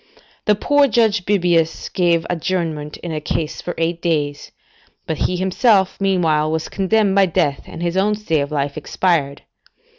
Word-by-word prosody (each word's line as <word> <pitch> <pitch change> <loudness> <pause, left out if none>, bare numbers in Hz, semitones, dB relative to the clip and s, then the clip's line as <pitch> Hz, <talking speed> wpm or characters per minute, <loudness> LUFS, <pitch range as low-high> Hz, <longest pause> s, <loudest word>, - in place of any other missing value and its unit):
The 210 - +4
poor 285 +6 +3
judge 220 -5 +1
Bebius 175 -5 +1
gave 170 -2 +1
adjournment 165 -4 -3
in 170 - -4
a 155 -1 -3
case 150 +1 -3
for 175 - -5
eight 165 +1 -1
days; 145 -4 -2 0.5
but 160 - -3
he 180 - -1
himself, 190 +1 +2
meanwhile, 165 -6 +1
was 160 0 -2
condemned 200 +1 +1
by 195 -1 +4
death, 145 -4 0
and 165 - -7
his 170 0 -1
own 205 +3 +2
stay 170 -8 -1
of 140 +1 -4
life 140 -1 -2
expired. 155 -3 -1
175 Hz, 160 wpm, -19 LUFS, 155-195 Hz, 0.5 s, The